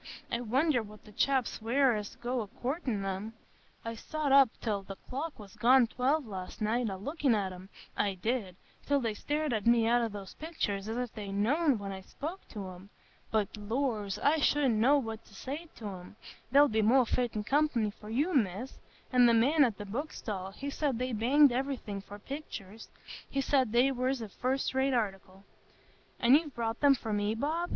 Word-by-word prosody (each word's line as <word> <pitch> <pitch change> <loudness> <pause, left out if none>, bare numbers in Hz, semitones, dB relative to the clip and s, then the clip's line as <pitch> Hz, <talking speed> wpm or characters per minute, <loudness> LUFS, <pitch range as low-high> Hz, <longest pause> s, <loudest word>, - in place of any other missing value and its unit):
I 235 - -1
wonder 255 +3 +2
what 210 -1 -12
the 210 - -13
chaps 260 +2 0
wear 250 +2 +3
as 210 -1 -5
go 245 0 -2
a 210 - -5
courtin' 245 - -3
'em! 195 +3 -4 0.5
I 230 - -3
sot 300 +4 -3
up 275 -2 +7
till 210 -4 -1
the 195 0 -8
clock 290 +10 -6
was 200 -3 -12
gone 250 +1 +5
twelve 265 +5 0
last 190 -4 -7
night, 225 +2 0
a 190 - -4
lookin' 280 - 0
at 195 -3 -1
'em,—I 190 +2 -4
did,—till 220 +6 -2
they 230 -4 -1
stared 295 +5 -1
at 215 -1 -1
me 235 -1 +5
out 240 +1 +3
o' 230 - +1
the 205 -3 -8
picturs 210 -12 -3
as 225 - -3
if 245 -2 -3
they'd 200 -2 -6
know 275 +9 +2
when 200 -2 -5
I 190 0 -6
spoke 320 - -7
to 200 -4 -7
'em. 185 +2 -13 0.4
But, 215 -1 0
lors! 215 -2 -2
I 295 +3 +3
shouldn't 290 -4 +3
know 245 +7 +4
what 225 -4 -4
to 205 - -17
say 290 - -6
to 225 - -10
'em. 185 0 -8 0.4
They'll 285 +1 +7
be 220 -4 +1
more 245 +4 +5
fittin' 230 -3 -1
company 255 -4 +1
for 210 0 -13
you, 290 +11 0
Miss; 225 - -1 0.3
and 245 -1 +6
the 230 - +5
man 285 +7 +5
at 230 -6 +1
the 205 - -6
book 265 +10 -4
stall, 190 -4 -5
he 275 +8 -6
said 280 -4 -1
they 255 +1 -2
banged 265 +6 +5
iverything 245 -6 -3
for 205 +1 -10
picturs; 220 -4 -8 0.4
he 275 - -2
said 265 -4 +2
they 245 +4 +4
was 260 +1 0
a 220 -2 -6
fust 260 +7 -1
rate 265 0 +2
article." 195 -4 -3 0.8
"And 240 +1 +5
you've 295 -2 +3
bought 230 0 -2
them 285 -1 +6
for 225 -4 -4
me, 205 +1 0
Bob?" 320 +8 -1
235 Hz, 195 wpm, -31 LUFS, 210-275 Hz, 0.8 s, up